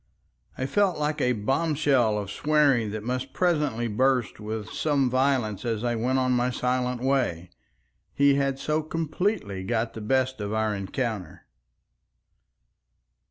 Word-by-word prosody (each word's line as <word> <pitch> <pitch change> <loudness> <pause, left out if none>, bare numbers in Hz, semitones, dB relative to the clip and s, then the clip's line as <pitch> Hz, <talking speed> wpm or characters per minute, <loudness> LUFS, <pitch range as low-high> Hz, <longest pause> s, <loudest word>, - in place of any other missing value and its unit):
I 130 - -2
felt 195 +5 +1
like 150 0 -1
a 125 - +2
bombshell 135 -1 +1
of 100 -3 -4
swearing 145 -7 +2
that 105 0 -5
must 125 +2 -3
presently 150 -10 +1
burst 125 +1 +1
with 110 0 -5
some 140 -5 +1
violence 130 -6 +1
as 115 -2 -2
I 120 -1 +1
went 125 +3 0
on 130 -1 +1
my 125 0 +2
silent 125 0 -1
way. 125 -11 0 0.6
He 140 0 +4
had 140 -1 0
so 150 +3 0
completely 155 - -2
got 115 +2 -1
the 110 - -7
best 130 +2 0
of 100 +1 -3
our 110 -1 0
encounter. 100 - -4
125 Hz, 140 wpm, -26 LUFS, 110-140 Hz, 0.6 s, He